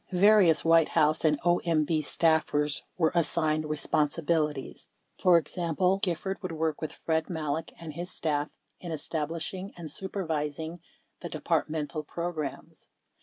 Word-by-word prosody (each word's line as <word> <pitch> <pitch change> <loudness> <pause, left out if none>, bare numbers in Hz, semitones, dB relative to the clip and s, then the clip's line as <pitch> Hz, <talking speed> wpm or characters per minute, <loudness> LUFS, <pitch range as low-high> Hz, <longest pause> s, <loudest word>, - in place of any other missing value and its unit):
Various 190 -4 +5
White 165 -1 +6
House 155 -1 +2
and 150 -2 +3
OMB 165 -2 +2
staffers 150 -2 +2 0.2
were 160 -3 +3
assigned 155 -2 +1
responsi 150 +1 -1
bilities. 150 -4 -1 0.3
For 180 -2 +6
example:... 175 +3 0
Gifford 190 +1 -2
would 185 -3 -4
work 160 -1 -1
with 155 - -3
Fred 160 +1 -1
Malek 160 -2 -3
and 165 -2 -7
his 175 +3 -5
staff 150 -4 -1 0.3
in 175 - -7
establishing 165 +5 -4
and 165 -4 -7
supervising 160 -3 -3 0.4
the - - -6
Departmental 155 -1 -1
programs. 160 -2 -5
160 Hz, 125 wpm, -28 LUFS, 150-175 Hz, 0.4 s, White